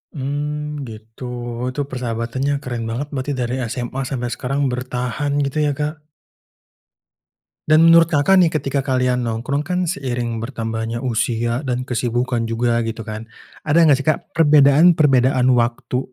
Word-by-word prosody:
Mmm, 145 +1 -4
gitu. 110 +3 -9 0.4
Itu 145 - -3
persahabatannya 125 +2 -2
keren 120 -3 -4
banget 125 +6 -3
berarti, 135 +1 -3
dari 125 0 -1 0.2
SMA 125 +1 -4
sampai 125 -3 -3
sekarang 135 +2 -3
bertahan, 125 +3 -3
gitu 140 +2 -2
ya, 145 - +1
Kak. 150 0 -4 1.6
Dan 155 +1 +5
menurut 165 0 +7
Kakak 165 +4 +3
nih, 175 - +5
ketika 145 -3 -1
kalian 125 -2 0
nongkrong 115 +5 -2
kan, 180 +4 -1
seiring 125 - -3
bertambahnya 115 -1 -4
usia 120 -1 0
dan 125 0 -1
kesibukan 120 -1 -1
juga 115 +1 0
gitu 115 0 -4
kan, 110 +1 -7 0.4
ada 165 +3 +5
enggak 150 -4 +5
sih, 140 - -7
Kak, 155 - 0
perbedaan-perbedaan 145 -3 +4
waktu 120 +1 0
130 Hz, 140 wpm, -20 LUFS, 120-145 Hz, 1.6 s, menurut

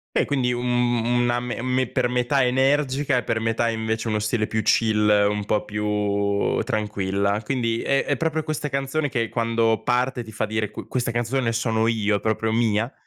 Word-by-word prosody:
Beh, - - +3
quindi 125 -3 0
un, 120 0 -3 0.3
mhmm 120 +1 +1
una 120 0 +1
me 125 -1 -5
me 130 -1 0
per 125 0 0
metà 125 +2 +1
energica 135 +1 +1
e 120 - 0
per 110 - -1
metà 115 +1 0
invece 110 0 -2
uno 105 0 0
stile 110 +1 0
più 110 0 -1
chill, 105 0 +2 0.2
un 105 0 -1
po' 105 +1 -1
più 105 -1 0
tranquilla. 100 -2 -1
Quindi 115 -2 -1
è 140 0 +1
è 145 - 0
proprio 160 +1 -1
questa 150 -1 -3
canzone 140 +2 -1
che 115 -4 -1
quando 115 -1 +1
parte 125 0 0
ti 110 - -11
fa 110 - -2
dire: 110 -1 -2
"Qu - - -9
questa 125 -2 -2
canzone 120 +1 0
sono 115 -1 0
io, 105 -2 +1
è - - -6
proprio 110 +1 -1
mia"? 115 +1 +1
115 Hz, 195 wpm, -23 LUFS, 110-125 Hz, 0.3 s, Beh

